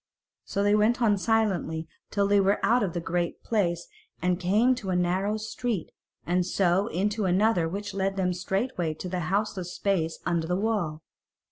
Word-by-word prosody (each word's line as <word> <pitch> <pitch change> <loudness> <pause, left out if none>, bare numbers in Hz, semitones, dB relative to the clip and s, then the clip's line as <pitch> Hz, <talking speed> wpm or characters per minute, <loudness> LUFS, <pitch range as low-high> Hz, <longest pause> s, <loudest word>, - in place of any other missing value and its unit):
So 200 - -1
they 205 0 +3
went 215 +4 +3
on 220 -4 +4
silently 190 -7 0 0.2
till 200 -1 +1
they 200 0 +4
were 195 +1 +3
out 245 +2 +4
of 190 -6 -1
the 175 - -2
Great 170 0 -2
Place 175 -6 0 0.3
and 180 0 0
came 205 +7 +3
into 250 -7 0
a 185 - +1
narrow 185 +4 +1
street, 215 -3 -3 0.3
and 180 +1 +1
so 185 +2 +1
into 210 +1 -1
another 185 -2 +2
which 205 +3 -5
led 195 0 -1
them 185 -2 0
straight 195 +7 -1
into 165 +1 -2
the 180 0 -2
houseless 195 -3 -1
space 170 -5 0
under 170 -2 0
the 180 - 0
wall. 195 -8 -1
195 Hz, 175 wpm, -27 LUFS, 175-210 Hz, 0.3 s, on